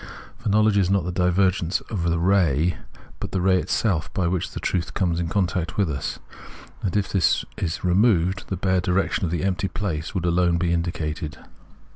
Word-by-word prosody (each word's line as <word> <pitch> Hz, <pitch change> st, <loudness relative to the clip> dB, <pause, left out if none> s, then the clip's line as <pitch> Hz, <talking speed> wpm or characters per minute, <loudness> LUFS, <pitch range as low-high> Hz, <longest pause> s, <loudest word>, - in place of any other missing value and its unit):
For -, -, -2 dB
knowledge 105 Hz, 0 st, +4 dB
is 95 Hz, -2 st, +2 dB
not 100 Hz, -2 st, +2 dB
tke 90 Hz, +1 st, -3 dB
divergence 90 Hz, -1 st, +2 dB
of 105 Hz, -, -5 dB
tke 85 Hz, 0 st, +1 dB
ray, 90 Hz, -4 st, +3 dB, 0.4 s
but -, -, -4 dB
tke 95 Hz, -2 st, -1 dB
ray 95 Hz, -1 st, +4 dB
itself 85 Hz, -6 st, 0 dB
by 95 Hz, -, +1 dB
wkick 90 Hz, 0 st, -1 dB
tke -, -, -6 dB
trutk 85 Hz, -2 st, -1 dB
comes 85 Hz, -3 st, 0 dB
in 85 Hz, -, -1 dB
contact 90 Hz, -2 st, -1 dB
witk 90 Hz, -8 st, 0 dB
us; 65 Hz, -, -4 dB, 0.6 s
and 95 Hz, 0 st, -1 dB
if 100 Hz, -, -1 dB
tkis 95 Hz, -3 st, +2 dB, 0.4 s
be -, -, 0 dB
removed, 95 Hz, -1 st, +2 dB
tke 95 Hz, -, -4 dB
bare 95 Hz, -1 st, +2 dB
direction 90 Hz, 0 st, 0 dB
or -, -, -3 dB
tke 85 Hz, 0 st, -1 dB
empty 95 Hz, 0 st, 0 dB
place 85 Hz, -4 st, -4 dB
would 90 Hz, -2 st, -1 dB
alone 85 Hz, 0 st, +2 dB
be 85 Hz, 0 st, +1 dB
indicated. 80 Hz, -2 st, -3 dB
90 Hz, 190 wpm, -24 LUFS, 85-95 Hz, 0.6 s, knowledge